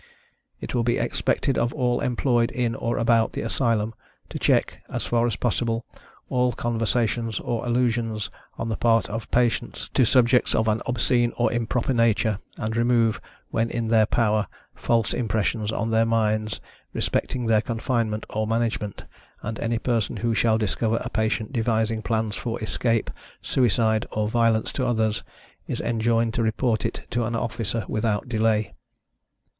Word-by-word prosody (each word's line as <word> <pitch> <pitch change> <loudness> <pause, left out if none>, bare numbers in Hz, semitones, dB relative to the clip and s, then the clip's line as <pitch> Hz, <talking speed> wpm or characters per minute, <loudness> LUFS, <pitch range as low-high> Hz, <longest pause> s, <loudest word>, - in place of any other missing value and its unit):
It - - -6
will 120 - +2
be 120 0 +1
expected 135 - 0
of 120 +1 +1
all 125 -4 +1
employed 120 -1 +1
in 120 -2 -1
or 115 +1 -2
about 115 -1 +3
the - - -3
Asylum, 115 -2 0 0.4
to - - -5
check, - - +1
as - - -2
far 120 0 +2
as 115 - -1
possible, 115 0 -1 0.4
all 125 -1 +1
conversations 115 -1 0
or 120 -2 -2
allusions, 115 -3 0 0.3
on 115 - -3
the 110 - -1
part 115 -3 +3
of 115 +1 -5
patients, 120 -3 0
to - - +4
subjects 125 +1 +4
of 110 - +2
an 110 0 +1
obscene 120 0 +1
or 120 - +2
improper 120 +2 0
nature, 115 -3 +2 0.2
and 110 +1 -3
remove, 115 -1 +2 0.3
when 115 0 0
in 115 -2 -2
their 110 -2 +4
power, 110 -2 +1 0.3
false 115 -3 0
impressions 110 -1 0
on 115 0 -2
their 115 0 +3
minds, 110 -1 0 0.3
respecting 125 -2 -1
their 110 -2 +3
confinement 115 -2 -1
or 110 0 -1
management; 115 -2 -1 0.4
and 115 +1 -4
any 115 0 0
person 115 -2 -1
who 115 0 0
shall 110 0 +3
discover 110 +1 0
a - - -5
patient 110 +1 -1
devising 110 -2 0
plans 110 -2 -1
for 120 -2 -3
escape, 115 +1 0 0.3
suicide, 115 -2 +1
or 105 0 0
violence 115 -1 +2
to 130 - -1
others, 110 -3 +1 0.5
is - - -3
enjoined 115 0 +1
to 120 - 0
report 115 0 +1
it 115 - -7
to 120 0 0
an 115 +1 -2
officer 115 -2 -2
without 110 -1 -1
delay. 110 -2 +1
115 Hz, 160 wpm, -24 LUFS, 110-120 Hz, 0.5 s, to